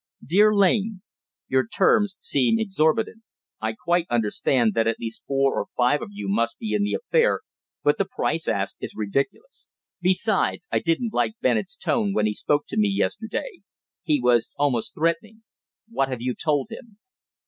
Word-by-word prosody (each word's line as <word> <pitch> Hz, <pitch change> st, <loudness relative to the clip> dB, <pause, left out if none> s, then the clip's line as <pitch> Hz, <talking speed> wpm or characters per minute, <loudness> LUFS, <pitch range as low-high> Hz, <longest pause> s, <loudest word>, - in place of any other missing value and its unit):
_"Dear 205 Hz, +7 st, +5 dB
Lane, 200 Hz, 0 st, +2 dB, 0.4 s
Your 130 Hz, -2 st, +1 dB
terms 200 Hz, -, +3 dB
seem 140 Hz, -, +2 dB
exorbitant. 215 Hz, +1 st, 0 dB, 0.4 s
I 110 Hz, 0 st, -1 dB
quite 175 Hz, +8 st, 0 dB
understand 115 Hz, +1 st, +1 dB
that 115 Hz, 0 st, +1 dB
at 115 Hz, -, 0 dB
least 115 Hz, -1 st, -7 dB
four 135 Hz, 0 st, +2 dB
or -, -, -2 dB
five 125 Hz, +4 st, +3 dB
of -, -, -6 dB
you 100 Hz, 0 st, -6 dB
must 115 Hz, +4 st, 0 dB
be 220 Hz, -, -4 dB
in 210 Hz, -, +1 dB
the 205 Hz, -, 0 dB
affair, 480 Hz, 0 st, +1 dB, 0.4 s
but 145 Hz, -, +2 dB
the 195 Hz, -, +2 dB
price 165 Hz, +1 st, -2 dB
asked -, -, -1 dB
is -, -, -6 dB
ridiculous. 140 Hz, -, -3 dB, 0.3 s
Besides, 185 Hz, -, +1 dB
I -, -, +2 dB
didn't 215 Hz, +7 st, -1 dB
like -, -, +1 dB
Bennett's -, -, 0 dB
tone 230 Hz, -, 0 dB
when 105 Hz, -, +2 dB
he 105 Hz, -, +1 dB
spoke 145 Hz, +7 st, 0 dB
to -, -, -4 dB
me 210 Hz, -1 st, +3 dB
yesterday. 225 Hz, -, -3 dB, 0.4 s
He 150 Hz, -2 st, +1 dB
was 120 Hz, -2 st, +3 dB
almost 135 Hz, -6 st, 0 dB
threatening. 215 Hz, +8 st, -1 dB, 0.4 s
What 135 Hz, -12 st, -1 dB
have 130 Hz, -2 st, -4 dB
you 125 Hz, 0 st, 0 dB
told 150 Hz, -, -1 dB
him? 230 Hz, -2 st, -11 dB
165 Hz, 170 wpm, -24 LUFS, -, 0.4 s, Dear